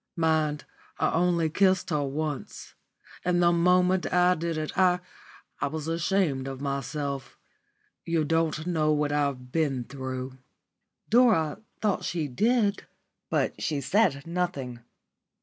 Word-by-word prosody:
Mind, 155 Hz, -2 st, +1 dB, 0.3 s
I -, -, +1 dB
only 170 Hz, -1 st, +2 dB
kissed 185 Hz, +3 st, +2 dB
her 150 Hz, -2 st, +1 dB
once. 145 Hz, +1 st, -4 dB, 0.5 s
And 175 Hz, 0 st, +2 dB
the 175 Hz, 0 st, +5 dB
moment 180 Hz, +2 st, +3 dB
I 180 Hz, 0 st, +4 dB
did 165 Hz, -1 st, -3 dB
it 155 Hz, -1 st, -4 dB
I 180 Hz, -1 st, +4 dB, 0.6 s
I -, -, 0 dB
was 155 Hz, -1 st, -5 dB
ashamed 165 Hz, -5 st, 0 dB
of 135 Hz, -1 st, -6 dB
myself. 140 Hz, 0 st, -4 dB, 0.7 s
You 165 Hz, -2 st, 0 dB
don't 160 Hz, 0 st, 0 dB
know 160 Hz, -3 st, +1 dB
what 150 Hz, -1 st, 0 dB
I've 140 Hz, -4 st, -1 dB
been 140 Hz, -6 st, 0 dB
through." 130 Hz, 0 st, -6 dB, 0.7 s
Dora 220 Hz, -11 st, +3 dB, 0.2 s
thought 210 Hz, -3 st, +1 dB
she 165 Hz, -4 st, -2 dB
did, 210 Hz, -, +1 dB, 0.4 s
but -, -, 0 dB
she 150 Hz, -3 st, -1 dB
said 145 Hz, -4 st, +1 dB
nothing. 170 Hz, -8 st, -3 dB
160 Hz, 130 wpm, -27 LUFS, 140-180 Hz, 0.7 s, the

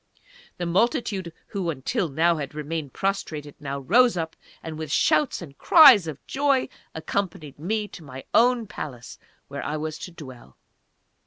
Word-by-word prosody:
The 175 Hz, -, -3 dB
multitude, 195 Hz, -, 0 dB, 0.2 s
who 190 Hz, -4 st, -2 dB
until 155 Hz, +4 st, -2 dB
now 165 Hz, +4 st, +2 dB
had 145 Hz, -1 st, -6 dB
remained 150 Hz, -1 st, -4 dB
prostrated, 155 Hz, -7 st, -3 dB
now 140 Hz, -1 st, -5 dB
rose 240 Hz, -, +4 dB
up, 160 Hz, -1 st, -3 dB, 0.3 s
and 160 Hz, -1 st, -6 dB
with 155 Hz, -2 st, -6 dB
shouts 255 Hz, -, +2 dB
and 140 Hz, -4 st, -12 dB
cries 265 Hz, -, +8 dB
of 155 Hz, -4 st, -7 dB
joy, 275 Hz, -1 st, +1 dB, 0.3 s
accompanied 160 Hz, -3 st, -4 dB
me 210 Hz, +6 st, -2 dB
to 165 Hz, -, -11 dB
my 135 Hz, -2 st, -9 dB
own 240 Hz, 0 st, +4 dB
palace, 130 Hz, -, -8 dB, 0.3 s
where -, -, -6 dB
I 155 Hz, -, -2 dB
was 155 Hz, 0 st, -4 dB
to 180 Hz, -, -8 dB
dwell. 130 Hz, -, -12 dB
165 Hz, 155 wpm, -25 LUFS, 150-200 Hz, 0.3 s, cries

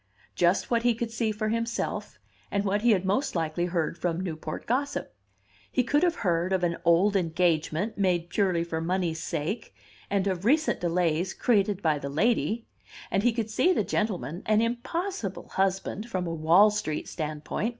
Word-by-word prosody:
Just 175 Hz, +6 st, +2 dB
what 235 Hz, -1 st, +3 dB
he 240 Hz, -1 st, +2 dB
could 230 Hz, 0 st, -3 dB
see 230 Hz, -1 st, 0 dB
for 215 Hz, +1 st, -2 dB
himself, 230 Hz, +1 st, -2 dB, 0.3 s
and 200 Hz, 0 st, -1 dB
what 205 Hz, +1 st, +1 dB
he 240 Hz, -, +3 dB
had 190 Hz, -4 st, +3 dB
most 205 Hz, +8 st, 0 dB
likely 165 Hz, +1 st, 0 dB
heard 170 Hz, -1 st, -1 dB
from 170 Hz, -1 st, -1 dB
Newport 160 Hz, -4 st, -5 dB
gossip. 280 Hz, +4 st, -1 dB, 0.6 s
He 255 Hz, -, +2 dB
could 290 Hz, +5 st, +2 dB
have 350 Hz, -1 st, +2 dB
heard 175 Hz, +1 st, +1 dB
of 190 Hz, -1 st, +1 dB
an 170 Hz, -1 st, +1 dB
old 175 Hz, +5 st, +4 dB
engagement, 170 Hz, +2 st, 0 dB
made 175 Hz, -3 st, +1 dB
purely 185 Hz, -5 st, +1 dB
for 160 Hz, -1 st, -3 dB
money's 170 Hz, -1 st, -1 dB
sake, 165 Hz, +7 st, -3 dB, 0.3 s
and 200 Hz, -1 st, +1 dB
of 185 Hz, -2 st, -1 dB
recent 305 Hz, +8 st, +2 dB
delays 175 Hz, +1 st, 0 dB
created 205 Hz, -4 st, +1 dB
by 155 Hz, -3 st, +2 dB
the 140 Hz, -, -5 dB
lady; 225 Hz, +7 st, +1 dB, 0.5 s
and 195 Hz, -, +2 dB
he 240 Hz, +3 st, +3 dB
could 225 Hz, -1 st, -3 dB
see 355 Hz, +11 st, +3 dB
the 220 Hz, -, +1 dB
gentleman 180 Hz, -, -2 dB
an 215 Hz, 0 st, +4 dB
impossible 240 Hz, -, -3 dB
husband 195 Hz, +3 st, -1 dB
from 185 Hz, -5 st, -2 dB
a 165 Hz, -, -3 dB
Wall 170 Hz, +6 st, +5 dB
Street 155 Hz, -7 st, -3 dB
standpoint! 155 Hz, +6 st, -3 dB
190 Hz, 175 wpm, -27 LUFS, 170-225 Hz, 0.6 s, Wall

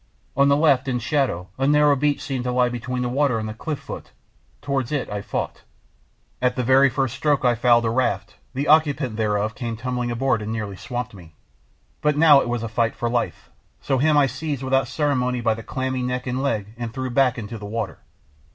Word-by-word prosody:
On 140 Hz, +1 st, +4 dB
the 140 Hz, 0 st, +4 dB
left, 145 Hz, -4 st, +3 dB
in 125 Hz, -2 st, 0 dB
shadow, 120 Hz, -, -1 dB
a 135 Hz, -, +2 dB
narrow 150 Hz, 0 st, +5 dB
beach 145 Hz, +1 st, 0 dB
seemed 135 Hz, -4 st, -3 dB
to 125 Hz, -, 0 dB
lie 125 Hz, 0 st, +2 dB
between 125 Hz, +1 st, -3 dB
the -, -, -1 dB
water 135 Hz, -1 st, +1 dB
and 110 Hz, 0 st, -3 dB
the 110 Hz, -, -5 dB
cliff 150 Hz, +6 st, -4 dB
foot; -, -, -9 dB, 0.5 s
towards 135 Hz, -3 st, -2 dB
it 145 Hz, -3 st, -1 dB
I 105 Hz, 0 st, -3 dB
fought. -, -, -4 dB, 0.8 s
At 125 Hz, 0 st, +2 dB
the 125 Hz, -, -1 dB
very 135 Hz, +3 st, +5 dB
first 135 Hz, -2 st, -1 dB
stroke 145 Hz, -3 st, +1 dB
I 120 Hz, -, +5 dB
fouled 120 Hz, 0 st, +3 dB
a 115 Hz, -, +1 dB
raft; 120 Hz, -5 st, -1 dB, 0.2 s
the 140 Hz, +3 st, -1 dB
occupant 145 Hz, -6 st, +3 dB
thereof 105 Hz, 0 st, 0 dB
came 115 Hz, -2 st, -5 dB
tumbling 125 Hz, 0 st, -2 dB
aboard 120 Hz, -1 st, 0 dB
and 105 Hz, +1 st, -4 dB
nearly 110 Hz, -3 st, -4 dB
swamped 125 Hz, +3 st, -5 dB
me. 85 Hz, -5 st, -14 dB, 0.7 s
But 150 Hz, -1 st, +1 dB
now 150 Hz, -3 st, +7 dB
it -, -, -3 dB
was 120 Hz, -1 st, -2 dB
a -, -, -2 dB
fight 115 Hz, +1 st, 0 dB
for 120 Hz, -1 st, -2 dB
life, 120 Hz, -1 st, -2 dB, 0.3 s
so 135 Hz, -2 st, 0 dB
him 150 Hz, +2 st, +3 dB
I 145 Hz, -, +6 dB
seized 135 Hz, +1 st, -4 dB
without 135 Hz, 0 st, +1 dB
ceremony 130 Hz, -3 st, 0 dB
by 115 Hz, -1 st, +2 dB
clammy 130 Hz, +2 st, -3 dB
neck 125 Hz, 0 st, -2 dB
and 125 Hz, +1 st, -2 dB
leg 110 Hz, -6 st, -2 dB
and 120 Hz, -1 st, -4 dB
threw 130 Hz, +2 st, -4 dB
back 130 Hz, 0 st, +3 dB
into 115 Hz, 0 st, -6 dB
the 105 Hz, -, -7 dB
water. 110 Hz, -2 st, -4 dB
125 Hz, 215 wpm, -23 LUFS, 115-140 Hz, 0.8 s, now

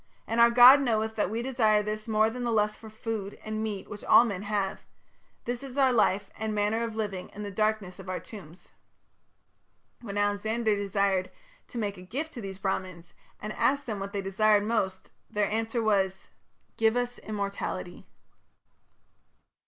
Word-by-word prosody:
And 230 Hz, +1 st, +1 dB
our 235 Hz, -, +8 dB
God 250 Hz, +4 st, +9 dB
knoweth 220 Hz, -3 st, 0 dB
that 210 Hz, -, 0 dB
we 225 Hz, +3 st, -3 dB
desire 220 Hz, -5 st, +2 dB
this 215 Hz, +1 st, -4 dB
more 220 Hz, 0 st, +3 dB
than 250 Hz, +1 st, -5 dB
the 240 Hz, -, 0 dB
lust 210 Hz, -1 st, +1 dB
for 220 Hz, -, -11 dB
food 215 Hz, -2 st, -5 dB
and 215 Hz, 0 st, -3 dB
meat 210 Hz, -3 st, -4 dB
which 210 Hz, -, -8 dB
all 240 Hz, -, +7 dB
men 200 Hz, -5 st, -3 dB
have: 205 Hz, -2 st, -2 dB, 0.6 s
this 240 Hz, 0 st, -3 dB
is 270 Hz, -1 st, -8 dB
our 265 Hz, -2 st, +4 dB
life 200 Hz, -3 st, +2 dB
and 220 Hz, -1 st, -2 dB
manner 210 Hz, +2 st, +1 dB
of 225 Hz, -1 st, -4 dB
living 200 Hz, -4 st, -4 dB
in 210 Hz, -, -6 dB
the 205 Hz, -, -5 dB
darkness 215 Hz, -2 st, -1 dB
of 190 Hz, -1 st, -9 dB
our 185 Hz, -, -2 dB
tombs.'" 185 Hz, -5 st, -12 dB, 1.3 s
When 205 Hz, -4 st, -6 dB
Alexander 210 Hz, +2 st, +1 dB
desired 195 Hz, -2 st, 0 dB, 0.4 s
to -, -, -9 dB
make 205 Hz, -3 st, -2 dB
a -, -, -10 dB
gift 275 Hz, -, -5 dB
to 240 Hz, -, -7 dB
these 195 Hz, -2 st, -6 dB
Brahmans, 185 Hz, -3 st, -4 dB, 0.3 s
and 210 Hz, +1 st, -5 dB
asked 280 Hz, +1 st, +1 dB
them 215 Hz, -4 st, -4 dB
what 195 Hz, 0 st, -5 dB
they 200 Hz, -1 st, -3 dB
desired 205 Hz, +2 st, +3 dB
most, 190 Hz, -4 st, -2 dB, 0.2 s
their 210 Hz, 0 st, +1 dB
answer 225 Hz, +1 st, -1 dB
was, 190 Hz, -3 st, 0 dB, 0.5 s
"Give 225 Hz, +1 st, +3 dB
us 245 Hz, 0 st, -2 dB
immortality". 200 Hz, -3 st, -5 dB
215 Hz, 175 wpm, -28 LUFS, 200-225 Hz, 1.3 s, God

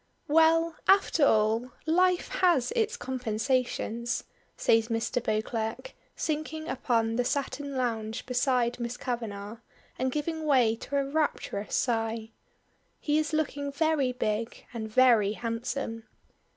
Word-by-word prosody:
"Well, 325 Hz, +1 st, +4 dB
after 385 Hz, -5 st, +4 dB
all, 220 Hz, +3 st, +2 dB
life 360 Hz, +2 st, +2 dB
has 345 Hz, -, +2 dB
its 455 Hz, 0 st, +1 dB
compensations," 240 Hz, -, -1 dB, 0.3 s
says 225 Hz, 0 st, +3 dB
Mr. 235 Hz, +1 st, -1 dB
Beauclerk, 220 Hz, -, -2 dB, 0.2 s
sinking 315 Hz, 0 st, -3 dB
upon 230 Hz, -3 st, 0 dB
the 245 Hz, -, +2 dB
satin 280 Hz, +1 st, -2 dB
lounge 225 Hz, -2 st, -2 dB
beside 250 Hz, -1 st, +1 dB
Miss 235 Hz, 0 st, -4 dB
Kavanagh, 220 Hz, -3 st, -4 dB, 0.4 s
and 260 Hz, +1 st, 0 dB
giving 315 Hz, +2 st, -3 dB
way 250 Hz, -6 st, +4 dB
to 280 Hz, +5 st, -6 dB
a 275 Hz, -, +1 dB
rapturous 275 Hz, -8 st, -1 dB
sigh. 225 Hz, -2 st, -1 dB, 0.7 s
He 300 Hz, 0 st, +1 dB
is 310 Hz, -, -1 dB
looking 285 Hz, -2 st, -1 dB
very 290 Hz, -3 st, +1 dB
big 225 Hz, -2 st, -3 dB
and 220 Hz, -2 st, -4 dB
very 225 Hz, -4 st, +5 dB
handsome. 230 Hz, 0 st, -4 dB
250 Hz, 120 wpm, -28 LUFS, 225-300 Hz, 0.7 s, very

